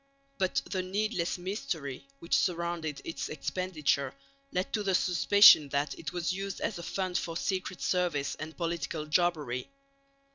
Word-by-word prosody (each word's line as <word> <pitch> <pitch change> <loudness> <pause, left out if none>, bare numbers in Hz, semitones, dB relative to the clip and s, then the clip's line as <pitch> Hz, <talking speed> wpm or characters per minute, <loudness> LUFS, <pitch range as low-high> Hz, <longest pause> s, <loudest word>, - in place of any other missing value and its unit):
But 190 -1 +1
the 185 - -1
needless 190 -1 -1
mystery 165 -8 -4
which 170 - -6
surrounded 170 -4 -1
its 165 - -4
expenditure 155 -5 -1 0.4
led 185 +1 -2
to 215 - +1
the 195 -2 +1
suspicion 180 -4 +7
that 140 +2 0
it 150 - -5
was 175 0 -1
used 195 0 -4
as - - -2
a - - -5
fund 185 +1 -1
for 165 -1 -4
secret 190 -1 -2
service 175 -6 0
and 155 +1 -8
political 165 -2 -2
jobbery. 150 -6 0
170 Hz, 145 wpm, -30 LUFS, 155-185 Hz, 0.4 s, suspicion